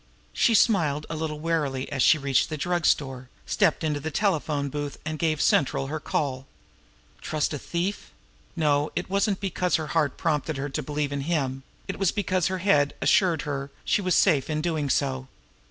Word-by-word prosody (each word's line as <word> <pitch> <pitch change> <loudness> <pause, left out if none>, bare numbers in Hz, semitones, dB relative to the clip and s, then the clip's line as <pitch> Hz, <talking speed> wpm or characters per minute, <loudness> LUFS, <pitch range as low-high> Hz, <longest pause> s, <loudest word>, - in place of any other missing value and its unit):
She 230 - +3
smiled 155 -10 +3
a - - -2
little 155 -1 -3
wearily 150 -5 -1
as 135 -2 -1
she 155 - +6
reached 140 -2 +1
the 155 - -3
drug 175 +2 0
store, 130 -3 0 0.2
stepped - - +1
into 150 -2 0
the 155 +3 -4
telephone 155 -5 0
booth, 145 +1 -4
and 155 0 -4
gave 155 -2 +1
central 135 -2 +2
her 155 - -2
call. 135 -3 -2 0.7
Trust 155 0 -1
a 145 - -3
thief! 180 +7 -3 0.5
No, 150 -2 +1
it - - -3
wasn't 200 0 +1
because 180 -2 0
her 155 -3 -2
heart 150 -5 +1
prompted 155 -3 -1
her 140 +2 -3
to 135 - -3
believe 145 -1 -2
in 140 -1 -2
him; 135 -4 -1 0.3
it - - -5
was 195 -3 +2
because 185 -3 0
her 185 0 -2
head 145 -7 +3
assured 175 -6 +3
her 140 -1 -4 0.2
she - - +2
was 185 -2 +1
safe 155 -8 +3
in 155 -1 -1
doing 155 -3 -1
so. 130 -1 0
150 Hz, 185 wpm, -26 LUFS, 140-170 Hz, 0.7 s, she